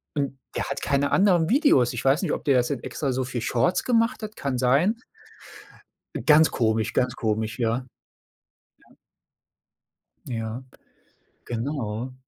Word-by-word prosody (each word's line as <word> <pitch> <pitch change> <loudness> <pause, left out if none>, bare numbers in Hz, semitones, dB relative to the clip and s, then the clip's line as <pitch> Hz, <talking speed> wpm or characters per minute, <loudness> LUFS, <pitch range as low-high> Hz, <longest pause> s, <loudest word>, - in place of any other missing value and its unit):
und 140 -2 -2 0.2
der - - -1
hat 135 - -4
keine 140 0 0
anderen 180 -4 +3
Videos. 245 - +4
Ich 120 - -4
weiß 135 +4 +3
nicht, - - -1
ob - - -4
der 140 - +3
jetzt 125 +1 +1
extra 140 +1 -3
so 130 +1 -1
viel 125 -1 -4
Shorts 125 +10 +1
gemacht 230 -1 +1
hat 215 0 -7
kann 135 -3 -3
sein. 140 - +2 1.3
Ganz 155 +1 +6
komisch, 110 -1 0
ganz 125 -1 0
komisch, 110 +1 -2
ja. 120 +2 -1 1.0
Ja. - - -24 1.3
Ja, 115 0 -4 0.8
genau. 120 -1 -4
130 Hz, 135 wpm, -24 LUFS, 120-155 Hz, 1.3 s, Ganz